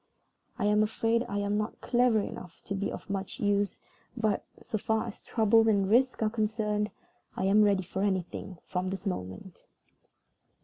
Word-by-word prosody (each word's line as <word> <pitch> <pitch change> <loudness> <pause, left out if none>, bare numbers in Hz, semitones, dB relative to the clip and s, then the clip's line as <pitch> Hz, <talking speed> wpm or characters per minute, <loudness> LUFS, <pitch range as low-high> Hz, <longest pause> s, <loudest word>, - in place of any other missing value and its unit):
I - - 0
am 210 +1 +4
afraid 225 +2 +1
I 205 - -2
am 205 +1 0
not 215 +1 -3
clever 245 -2 +3
enough 180 -3 -8
to 200 - -3
be 200 0 -1
of - - -7
much 195 -1 -4
use; 205 -1 +1 0.4
but, 215 -3 +1 0.2
so 215 - -3
far 220 +2 0
as 225 - -8
troubles 225 0 +3
and 200 -2 +3
risks 250 0 +3
are 215 - +3
concerned, 210 -1 0 0.5
I - - -1
am 200 +2 +5
ready 200 -2 +3
for 190 +2 -4
anything 190 -1 -2
from 185 0 -2
this 190 +1 -4
moment." 165 - -5
205 Hz, 170 wpm, -29 LUFS, 195-220 Hz, 0.5 s, am